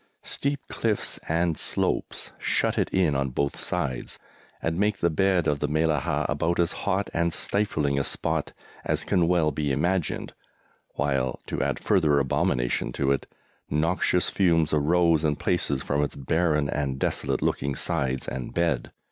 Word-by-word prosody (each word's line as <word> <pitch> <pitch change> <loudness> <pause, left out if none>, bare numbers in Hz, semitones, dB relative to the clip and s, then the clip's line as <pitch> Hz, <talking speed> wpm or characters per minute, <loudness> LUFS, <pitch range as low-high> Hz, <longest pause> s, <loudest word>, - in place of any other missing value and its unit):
Steep 140 0 -2
cliffs 110 -3 -2
and 85 0 +1
slopes - - -2
shut - - +1
it - - +1
in 90 -6 +2
on 70 0 0
both 70 +2 -1
sides, 65 - -3 0.4
and 80 +2 -2
make 105 0 +2
the 85 -2 +1
bed 95 0 +2
of 75 -1 +1
the - - 0
Mellahah 80 +1 +1
about 85 +2 0
as 85 0 +2 0.2
hot 100 +1 +1
and 85 +1 +1
stifling 80 -8 0
a - - +1
spot - - -1 0.3
as - - 0
can 85 -2 +2
well 85 -3 +3
be 75 0 -1
imagined, 90 +4 -1 0.6
while, 65 -2 0
to - - -3
add - - 0
further 80 -8 +2
abomination 60 -3 0
to 70 +1 +1
it, 70 - -1 0.4
noxious 85 +4 +1
fumes 85 -5 +2
arose 80 +1 +3
in 75 -2 +2
places 70 -5 0
from 70 +1 0
its 75 - -3
barren 75 +1 +1
and 70 -2 -2
desolate - - -1
looking 70 0 0
sides 65 -1 -1
and 65 -2 -5
bed. 85 -7 0
80 Hz, 155 wpm, -26 LUFS, 70-90 Hz, 0.6 s, well